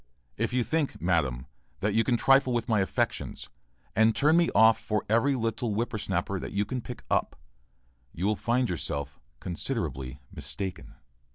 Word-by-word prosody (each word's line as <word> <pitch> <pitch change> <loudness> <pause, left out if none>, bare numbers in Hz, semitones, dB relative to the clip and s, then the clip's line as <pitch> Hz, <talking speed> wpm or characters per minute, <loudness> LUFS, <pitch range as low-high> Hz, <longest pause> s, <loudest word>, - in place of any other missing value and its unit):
If 115 +2 -1
you 125 0 +1
think, 155 +2 -1
madam, 75 -8 0 0.4
that 105 +1 +1
you 115 +1 +3
can 120 -1 +2
trifle 135 0 +4
with 120 -1 -1
my 110 -3 +2
affections, 95 - -2 0.5
and 110 +1 +4
turn 150 +3 +4
me 170 0 +4
off 110 0 +6
for 105 -1 -2
every 115 +6 +3
little 115 -2 -1
whipper 115 0 -1
snapper 95 0 -1
that - - -6
you 100 +1 +1
can 130 +2 -3
pick 125 +1 -8
up, - - +1 0.8
you 90 - -3
will 105 +1 +2
find 120 +4 +1
yourself 70 -5 -3 0.2
considerably 75 - -4
mistaken. 95 -3 -5
110 Hz, 165 wpm, -28 LUFS, 90-120 Hz, 0.8 s, off